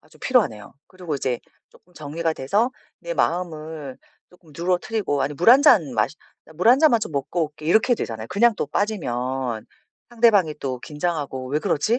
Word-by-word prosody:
아 - - -25
좀 - - -21
필요하네요. 205 - 0
그리고 180 -4 -6
이제 130 -3 -2 0.3
쪼끔 180 - -24
정리가 160 +1 -3
돼서 205 - 0 0.3
내 - - -5
마음을 160 - -3 0.3
쪼끔 180 -3 -21
누그러뜨리고 180 - -1
아니 150 - -2
물 175 +10 +5
1 260 +3 +8
잔 170 - +5
마시 105 +5 0 0.3
"나 - - -17
물 180 +8 +1
1 250 +3 +7
잔만 285 -7 +4
좀 - - -4
먹고 150 +4 -1
올게." 150 0 -12
이렇게 220 +8 +4
되잖아요. 110 -1 -5
그냥 230 +4 +3
또 - - -1
빠지면 130 - -2 0.4
상대방이 225 -9 +3
또 130 -2 -3
긴장하고 150 -4 -4
'왜 145 +3 0
그러지?' 185 - 0
160 Hz, 360 characters per minute, -23 LUFS, 140-210 Hz, 0.4 s, 1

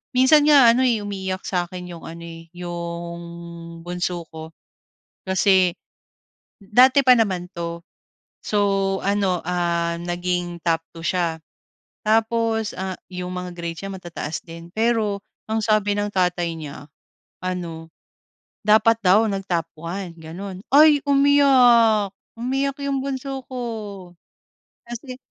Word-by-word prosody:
minsan 260 +4 +6
nga 285 -5 +7
ano, 250 - +2
eh, 235 -3 +2
umiiyak 190 -2 -4
sa 180 -2 0
akin 180 0 -8
yung - - -15
ano, 170 +1 -9
eh, 165 0 -11
yung 170 -1 -5 0.6
bunso 175 -1 -3
ko, 160 0 -9 0.8
kasi 190 -1 +4 0.9
dati 255 +7 +5
pa 255 - +8
naman 190 -6 0
'to. 170 0 -4 0.7
So, 210 - +1 0.5
ano, 195 -3 +1
ah, 170 -1 0
naging 175 0 -3
top 165 -1 +2
2 165 0 -8
siya, 170 -3 0 0.7
tapos, 225 0 +1
ah, 190 0 -3 0.2
yung 180 0 -4
mga 180 0 -5
grades 170 -1 -5
niya 195 - -5
matataas 175 -4 -6
din. 170 0 -10
Pero 220 -3 +1 0.3
ang 220 0 0
sabi 210 -1 +2
ng 205 0 -1
tatay 180 -2 +1
niya, 145 -3 -9 0.6
ano, 170 -3 -4 0.8
dapat 220 +2 +5
daw 200 +5 +6
nag-top 190 -5 -2
1 175 +2 -5
gano'n. 185 +4 -8
Ay! 300 +1 +8
umiyak, 255 -7 +5 0.3
umiyak 270 +4 -1
yung 275 -1 0
bunso 270 0 -4
ko. 255 -1 -6 1.3
Kasi 240 +2 -8
190 Hz, 125 wpm, -22 LUFS, 170-225 Hz, 1.3 s, pa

